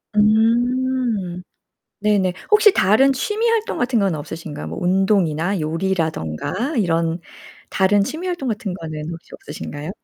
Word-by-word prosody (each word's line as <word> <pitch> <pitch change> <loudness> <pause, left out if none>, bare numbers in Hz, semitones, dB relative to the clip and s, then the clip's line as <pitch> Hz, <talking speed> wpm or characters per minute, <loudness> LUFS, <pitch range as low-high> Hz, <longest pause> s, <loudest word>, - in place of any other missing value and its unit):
음 225 -2 +2 0.6
네네. 200 -4 +2 0.2
혹시 425 -1 +6
다른 245 - +4
취미 420 - -1
활동 450 -1 0
같은 245 -1 +1
건 195 -5 +1
없으신가요? 150 - -6
뭐 80 - -6
운동이나 185 -2 +1
요리라든가 165 - -2
이런 165 -4 0 0.5
다른 200 +1 +3
취미 320 - -4
활동 345 -7 -3
같은 210 -4 -3
거는 155 -3 -6
혹시 170 0 -10
없으신가요? 145 +1 -7
195 Hz, 285 characters per minute, -20 LUFS, 165-245 Hz, 0.6 s, 혹시